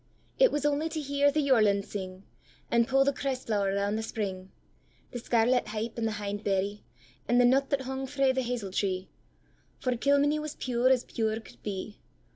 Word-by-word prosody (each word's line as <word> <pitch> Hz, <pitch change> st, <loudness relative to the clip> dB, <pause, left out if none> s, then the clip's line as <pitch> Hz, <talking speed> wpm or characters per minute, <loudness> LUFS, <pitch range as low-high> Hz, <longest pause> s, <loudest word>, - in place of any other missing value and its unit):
It -, -, +6 dB
was 295 Hz, -1 st, -1 dB
only 295 Hz, +2 st, +1 dB
to 320 Hz, 0 st, -4 dB
hear 285 Hz, 0 st, +2 dB
the 300 Hz, +1 st, +1 dB
yorlin 215 Hz, -7 st, +3 dB
sing, 190 Hz, -2 st, -7 dB, 0.5 s
And 235 Hz, -1 st, +3 dB
pu' 270 Hz, 0 st, +4 dB
the 280 Hz, +1 st, +1 dB
cress 270 Hz, -2 st, -3 dB
flower 200 Hz, -3 st, 0 dB
round 200 Hz, +2 st, 0 dB
the -, -, -2 dB
spring; 195 Hz, -4 st, -4 dB, 0.6 s
The 245 Hz, -, -5 dB
scarlet 240 Hz, +2 st, +2 dB
hypp 220 Hz, +2 st, -4 dB
and 230 Hz, -1 st, -1 dB
the 220 Hz, -, -2 dB
hindberrye, 205 Hz, -1 st, -2 dB, 0.5 s
And 245 Hz, -, +3 dB
the 245 Hz, -, +6 dB
nut 270 Hz, +3 st, +3 dB
that 280 Hz, -1 st, 0 dB
hung 265 Hz, +1 st, -4 dB
frae 275 Hz, -1 st, +2 dB
the 260 Hz, 0 st, 0 dB
hazel 235 Hz, -6 st, -3 dB
tree; 185 Hz, -1 st, -1 dB, 0.7 s
For 255 Hz, -, -1 dB
Kilmeny 285 Hz, +4 st, +2 dB
was 305 Hz, -1 st, -5 dB
pure 250 Hz, 0 st, +1 dB
as 255 Hz, -2 st, +3 dB
pure 220 Hz, -1 st, -2 dB
could 220 Hz, -, -16 dB
be. 205 Hz, +1 st, -5 dB
235 Hz, 190 wpm, -29 LUFS, 205-275 Hz, 0.7 s, It